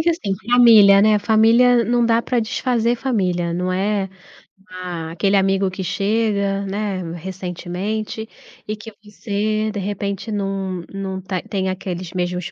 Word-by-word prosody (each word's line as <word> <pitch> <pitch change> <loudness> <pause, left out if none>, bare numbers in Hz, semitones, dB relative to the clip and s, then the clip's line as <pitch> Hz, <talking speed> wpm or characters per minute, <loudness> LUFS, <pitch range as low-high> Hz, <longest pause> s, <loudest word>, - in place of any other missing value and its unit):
que, 340 - +3
assim, 210 - -2 0.2
família, 220 -5 +7
né. 210 0 +4
Família, 230 +3 +4
não 240 0 +2
dá 230 0 +3
pra 245 0 0
desfazer 235 +1 0
família, 180 -9 -1
não 180 +1 -1
é, 195 +1 0 0.6
a 175 -3 -6
aquele 195 +4 +1
amigo 195 0 +1
que 190 - -6
chega, 200 0 0
né, 195 -1 -3
recentemente 190 +5 -5 0.4
e 215 - -2
que 215 +1 -11
você, 215 +1 -2
de 205 - -4
repente, 200 +1 -4
num 195 -3 -3
num 190 -1 -4
ta 185 -1 -3
tem 190 -2 -2
aqueles 185 -2 -5
mesmos 180 -1 -3
200 Hz, 145 wpm, -20 LUFS, 185-220 Hz, 0.6 s, família